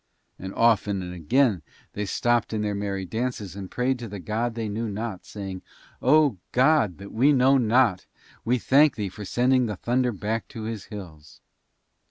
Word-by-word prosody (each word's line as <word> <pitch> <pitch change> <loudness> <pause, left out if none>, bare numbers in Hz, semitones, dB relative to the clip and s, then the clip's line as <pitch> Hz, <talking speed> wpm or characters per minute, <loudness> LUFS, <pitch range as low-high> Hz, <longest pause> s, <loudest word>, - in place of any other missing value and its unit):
And 95 +1 -6
often 105 -4 +2
and 90 0 -6
again 100 - +2 0.3
they 105 - -3
stopped 120 +2 +1
in 105 -1 -1
their 105 -1 -1
merry 100 -1 -3
dances 110 -3 -4
and 95 -2 -7
prayed 125 +1 -1
to 120 - -6
the 100 -1 -7
God 115 +5 -2
they 115 -2 -3
knew 110 +2 -3
not, 105 -1 -5
saying, 95 -3 -6 0.4
"O, 145 -4 +4 0.2
God 130 - +3
that 100 0 -10
we 130 +6 +4
know 135 0 +4
not, 115 -4 +2 0.4
we 125 +2 +2
thank 140 +4 +4
Thee 105 -4 -3
for 105 +2 -9
sending 125 +4 +2
the 105 - -3
thunder 125 +5 0
back 110 +2 -3
to 115 -4 -8
his 110 -2 -5
hills." 80 -8 -11
110 Hz, 180 wpm, -25 LUFS, 100-125 Hz, 0.4 s, O